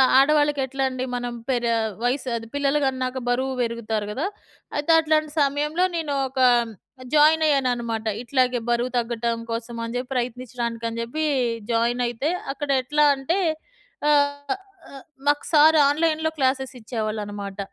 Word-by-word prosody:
ఆహ్, 260 - +5
ఆడవాళ్ళకి 290 +1 +4
ఎట్లండి 265 -1 -2
మనం 245 0 -3
పేరే 240 -3 0 0.3
వయసు 255 +2 0
అది 230 0 -4
పిల్లలు 285 +1 +1
గన్నాక 260 -1 -1
బరువు 260 +2 0
బెరుగుతారు 225 -3 -2
కదా! 275 - -2 0.5
అయితే 295 +2 -1
అట్లాంటి 310 -1 +1
సమయంలో 295 +5 +1
నేను 320 -3 -2
ఒక 265 0 -4 0.7
జాయిన్ 310 +2 +5
అయ్యాననమాట. 240 -6 0 0.2
ఇట్లాగే 255 -1 +1
బరువు 240 +1 +1
తగ్గటం 235 0 -1
కోసం 230 +1 -4
అని 230 +1 -5
చెప్పి 250 +1 -4
ప్రయత్నించడానికని 235 -2 -3
జెప్పి 275 +7 -2 0.5
జాయినయితే 240 +3 0 0.2
అక్కడ 285 0 -5
ఎట్లా 295 +3 +3
అంటే 300 +8 -1 0.7
ఆహ్, 285 +4 +2 0.4
ఆహ్, 275 - -11 0.2
మాకు 290 0 +2
సారు 310 0 +6
ఆన్‌లైన్‌లో 315 +1 +1
క్లాసెసిచ్చేవాళ్ళనమాట. 220 -6 -3
260 Hz, 125 wpm, -23 LUFS, 235-290 Hz, 0.7 s, సారు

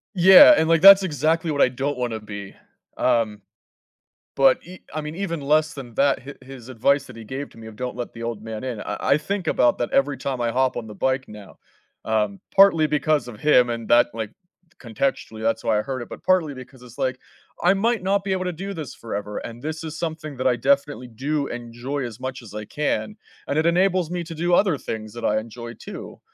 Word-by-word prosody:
Yeah, 190 - +9
and, 160 - +2
like, 165 -1 +3
that's 195 0 +10
exactly 160 0 0
what 145 - 0
I - - +5
don't 135 +2 -3
wanna 120 -3 -2
be, 100 -2 -9 0.4
um, 110 -3 +1 0.9
but, 135 -1 +5
ev 185 +1 -11
I 155 - -3
mean, 150 +2 -6
even 170 -5 -3
less 155 +2 +2
than 125 -5 -9
that, 140 0 +2
his 140 +2 -10
his 130 -2 -12
advice 140 +4 +1
that 125 - -12
he 115 - -9
gave 135 +6 -6
to - - -18
me 110 0 -10
of 110 - -11
don't 125 +1 -5
let 120 -1 -6
the 115 - -8
old 115 -3 -4
man 110 +1 -7
in, 120 -5 -4
I - - -4
I 140 - +3
think 185 +2 -4
about 120 - +3
that 120 - -2
every 140 -1 +2
time 130 -2 -3
I 115 -1 0
hop 130 +1 +1
on 110 - -5
the 105 - -10
bike 130 +4 0
now. 105 -2 -12 0.5
Um, 105 -3 0 0.2
partly 180 -6 +6
because 150 -2 +1
of 110 -4 -10
him 125 -5 +4
and 115 -1 -4
that 120 0 +6
like, 110 -2 -5 0.5
contextually, 115 -2 -3
that's 115 +1 0
why 110 -2 +2
I - - +1
heard 130 0 -5
it, 120 - -7
but - - -10
partly 180 -6 +2
because 130 0 -12
it's, 120 -1 -14
like, 130 0 -1 0.4
I 180 +2 +5
might 220 +1 0
not 195 +1 +1
be 195 - -3
able 185 -1 -2
to 180 - -2
do 195 +4 -6
this 155 -6 -7
forever, 105 -2 -6
and 115 +1 -9
this 155 +3 -5
is 160 0 -6
something 160 -4 -5
that 130 0 0
I 125 - +3
definitely 140 -1 0
do 140 +5 -2
enjoy 120 +4 -5
as 120 0 -8
much 130 0 -5
as 105 -2 -12
I 105 0 -6
can, 110 -7 -2 0.3
and 140 - -1
it 160 - +2
enables 180 0 +2
me 175 -1 -2
to 165 -1 -8
do 175 +2 0
other 180 -6 +3
things 110 -3 -6
that 120 - -5
I 105 +1 +2
enjoy 115 +1 -9
too. - - -10
130 Hz, 230 wpm, -23 LUFS, 115-155 Hz, 0.9 s, that's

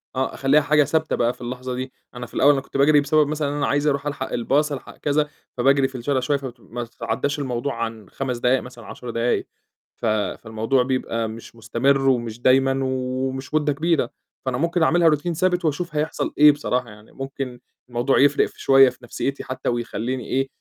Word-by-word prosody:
آه، 130 +1 -1
أخليها 140 +3 +3
حاجة 150 +1 +4
ثابتة 155 +3 0
بقى 120 +1 +1
في - - -19
اللحظة 125 +1 -5
دي، 130 +1 -5 0.2
أنا 125 0 -5
في - - -17
الأول 145 - +5
أنا 135 - -1
كنت 140 - -6
باجري 145 +1 +5
بسبب 150 +1 +3
مثلًا 150 -1 -1
أنا 145 - 0
عايز 145 +1 +1
أرُوح 140 0 0
ألحق 145 - -4
الباص 145 +6 +1
ألحق 140 - -7
كذا، 150 0 +1 0.3
فباجري 135 +2 +4
في 130 - -13
الشارع 130 +2 0
شوية، 140 +3 +1
فت 130 -3 -8
فما 120 +1 -7
تتعداش 115 +5 -3
الموضوع 130 0 -2
عن 110 -3 -6
5 130 -3 -3
دقايق 125 +2 +2
مثلًا 120 -2 -11
10 125 - -8
دقايق. 115 +1 0 0.5
ف - - -5
فالموضوع 110 +3 0
بيبقى 125 -3 -1
مش 115 +1 -10
مستمر 135 +5 +1
ومش 120 -2 -1
دايمًا 135 +1 +4
ومش 130 +1 -3
مدة 150 -1 +2
كبيرة، 155 -4 +1 0.4
فأنا 130 -1 -1
ممكن 170 +3 +1
أعملها 170 0 +4
Routine 150 +3 0
ثابت 180 +1 +1
وأشوف 155 +1 -2
هيحصل 150 +2 -1
إيه 150 0 +9
بصراحة 125 -4 -2
يعني، 105 0 -15
ممكن 135 -2 -6 0.3
الموضوع 120 +3 +1
يفرق 140 +1 +4
شوية 135 -1 +6
في 125 - -13
نفسيتي 135 +3 -3
حتى 130 0 -3
ويخليني 120 +1 -3
إيه، 135 +1 0
135 Hz, 190 wpm, -23 LUFS, 120-145 Hz, 0.5 s, إيه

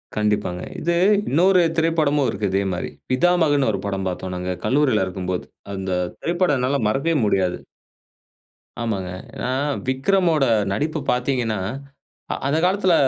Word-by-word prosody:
கண்டிப்பாங்க. 105 -4 0 0.2
இது 170 +1 +1 0.3
இன்னொரு 180 +5 +4 0.2
திரைப்படமும் 155 -4 +2
இருக்கு. 100 0 -2
இதே 95 +1 +2
மாதிரி 90 - -3 0.2
பிதாமகன்னு 145 -3 +3
ஒரு 100 - -3
படம் 95 -1 -2
பார்த்தோம் 90 0 -4
நாங்க 90 0 -3
கல்லூரியில 130 -8 +2
இருக்கும்போது. 90 -1 -3 0.3
அந்த 95 -1 -4 0.3
திரைப்படம் 175 -4 +1
என்னால 135 +3 +1
மறக்கவே 140 +8 0
முடியாது. 95 -3 +1 1.2
ஆமாங்க. 95 -6 -2 0.2
ஏன்னா, 125 - -2 0.4
விக்ரமோட 155 +3 +2 0.3
நடிப்பு 155 +7 -1
பார்த்தீங்கன்னா, 125 -4 0 0.7
அ - - +1
அந்த 150 +3 +2
காலத்தில 185 -1 +3
130 Hz, 125 wpm, -22 LUFS, 95-160 Hz, 1.2 s, இன்னொரு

